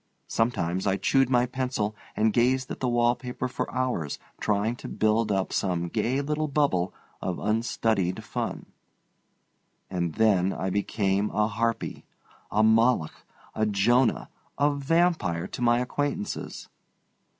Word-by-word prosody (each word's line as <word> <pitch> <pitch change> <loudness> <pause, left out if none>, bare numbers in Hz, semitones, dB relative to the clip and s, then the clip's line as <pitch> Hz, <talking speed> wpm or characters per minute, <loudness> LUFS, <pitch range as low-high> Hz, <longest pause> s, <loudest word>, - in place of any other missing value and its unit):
Sometimes 95 -5 0
I 95 0 +2
chewed 130 +6 +2
my 125 -1 +3
pencil 125 -4 -2 0.2
and 110 0 +2
gazed 130 +2 +2
at - - -5
the 130 - 0
wall 120 0 +3
paper 125 0 -4
for 125 - -4
hours 125 - -1 0.2
trying 105 +3 0
to - - -8
build 110 0 +1
up 95 -1 0
some 85 -3 0
gay 130 +10 0
little 150 +2 -1
bubble 135 -12 +1 0.3
of 90 -1 -2
unstudied 110 -4 0
fun. - - -4 1.3
And 85 -3 -2
then 100 -4 +3
I 95 - -2
became 100 0 0
a 105 0 +1
harpy, 115 +1 -2 0.5
a 105 +1 +2
Moloch, 110 -5 +3 0.3
a 110 0 +1
Jonah, 115 +5 +2 0.3
a 145 +1 +3
vampire, 140 - +1
to - - -7
my 120 0 +4
acquaintances. 140 -3 -3
110 Hz, 135 wpm, -27 LUFS, 100-125 Hz, 1.3 s, my